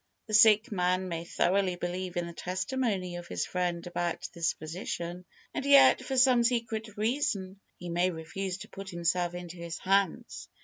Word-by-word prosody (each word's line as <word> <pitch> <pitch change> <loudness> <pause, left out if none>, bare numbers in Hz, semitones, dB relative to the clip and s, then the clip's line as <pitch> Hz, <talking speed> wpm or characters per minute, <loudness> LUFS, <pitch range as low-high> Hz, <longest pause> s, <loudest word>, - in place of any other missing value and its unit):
The 215 - -8
sick 220 +2 +6
man 185 -1 0
may 165 0 -4
thoroughly 185 +1 +1
believe 175 0 -4
in 175 - 0
the 170 - -8
testimony 185 0 -2
of 175 0 -8
his - - -2
friend 175 -2 -2
about 175 -1 -3
this 170 -1 +1
physician, 175 +2 -6 0.3
and - - -3
yet, 280 0 +6
for 265 - -3
some 250 -2 +5
secret 230 -3 -1
reason, 210 -5 -1 0.2
he 175 - -8
may 175 +2 +2
refuse 180 +3 -4
to - - -10
put 195 0 -8
himself 175 0 0
into 175 0 -7
his 170 0 -6
hands. 195 -2 0
185 Hz, 170 wpm, -29 LUFS, 175-210 Hz, 0.3 s, sick